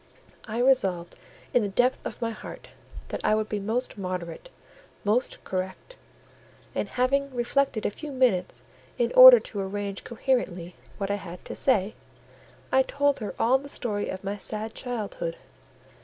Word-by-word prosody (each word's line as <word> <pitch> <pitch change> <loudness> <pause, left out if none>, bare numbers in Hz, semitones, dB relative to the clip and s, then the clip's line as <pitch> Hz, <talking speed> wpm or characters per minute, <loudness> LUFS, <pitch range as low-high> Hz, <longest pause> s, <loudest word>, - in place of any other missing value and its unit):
I 220 0 -5
resolved, 195 -9 +2 0.4
in 245 - +4
the 205 - -1
depth 245 +6 +2
of - - -5
my 230 - 0
heart, 220 - -10 0.4
that - - -4
I 215 - +3
would 215 0 -1
be 210 - -2
most 225 +2 -2
moderate—most 200 - -4
correct; 190 - -5 0.8
and, - - -2
having 275 +3 +1
reflected 245 -1 0
a - - +1
few 295 +6 -8
minutes 250 -9 +1 0.3
in 485 - +1
order - - +11
to 205 - -7
arrange 200 0 -4
coherently 220 -8 -1 0.2
what 200 0 -2
I 205 - 0
had 175 -1 -10
to - - -6
say, 210 -6 +2 0.8
I 265 - +5
told 280 +1 +1
her 215 - -5
all 255 +4 +3
the 280 +1 -11
story 210 -7 -3
of 190 - -5
my 200 +1 -3
sad 215 +2 -4
childhood. 210 -9 -4
220 Hz, 155 wpm, -26 LUFS, 195-260 Hz, 0.8 s, order